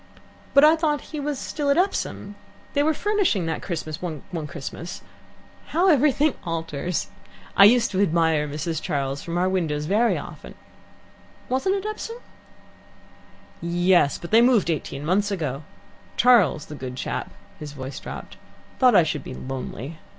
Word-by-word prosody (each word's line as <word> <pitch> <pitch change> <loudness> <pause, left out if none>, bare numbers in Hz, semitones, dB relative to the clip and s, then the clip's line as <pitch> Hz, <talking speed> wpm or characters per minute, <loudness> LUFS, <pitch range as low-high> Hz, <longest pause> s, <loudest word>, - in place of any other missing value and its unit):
"But 280 - +8
I 310 +2 +7
thought 305 -3 0
he 305 - -3
was 290 -1 -2
still 290 +2 -3
at 280 - +3
Epsom. 360 - -1 0.4
They 285 - +2
were 310 +2 +3
furnishing 370 - +1
that 160 -1 -2
Christmas 155 -4 -5
one 160 -6 -5 0.2
Christmas. 160 +5 -7 0.6
How 355 +4 +2
everything 295 0 +3
alters! 165 -1 -3 0.5
I 200 - +9
used 235 +2 +5
to 190 0 +1
admire 160 -4 +2
Mrs. 155 +2 -3
Charles 140 0 -2
from 170 0 -4
our 180 +1 +2
windows 160 -6 -1
very 215 +7 +2
often. - - -9 0.9
Wasn't 360 +10 +1
it 395 0 -4
Epsom?" 430 +2 -5 1.4
"Yes, 175 -3 +3
but 170 - -9
they 225 +2 +7
moved 235 -8 +4
eighteen 145 -2 -4
months 200 +5 +2
ago. 150 -8 -3 0.6
Charles, 205 - +4
the - - -9
good 130 -3 -6
chap" - - -4 0.3
his 150 -1 -7
voice 135 -1 -7
dropped - - -9 0.4
"thought 255 -2 +5
I 175 - +7
should 150 -3 -3
be 130 - -7
lonely. 135 +3 -6
180 Hz, 150 wpm, -24 LUFS, -, 1.4 s, I